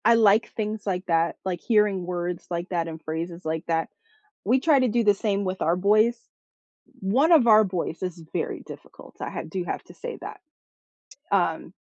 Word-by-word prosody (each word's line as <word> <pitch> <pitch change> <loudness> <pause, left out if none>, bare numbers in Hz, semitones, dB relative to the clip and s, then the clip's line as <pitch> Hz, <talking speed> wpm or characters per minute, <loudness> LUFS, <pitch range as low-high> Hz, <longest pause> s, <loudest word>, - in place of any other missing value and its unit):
I 235 +2 +6
like 220 -1 +4
things 215 -1 -3
like 185 -1 -1
that, 165 -1 +2
like 180 -3 -2
hearing 210 -5 +2
words 175 -1 -4
like 175 +1 -3
that 170 -2 -1
and 160 -1 -7
phrases 170 +2 -5
like 160 0 -2
that. 165 -1 0 0.5
We 245 +6 +3
try 285 0 +4
to 255 - +3
do 235 +1 +1
the 205 -1 +5
same 200 0 -1
with 185 0 -3
our 165 +2 +2
boys. 215 +5 +3 0.8
One 255 - +3
of 295 -8 +6
our 215 -1 +7
boys 180 -3 -3
is 180 -2 -4
very - - -2
difficult, - - -13
I - - -4
ha - - -4
do 180 +2 -4
have - - -4
to - - -15
say 485 -1 -7
that. - - -8 0.9
Um - - 0
190 Hz, 190 wpm, -25 LUFS, 175-220 Hz, 0.9 s, our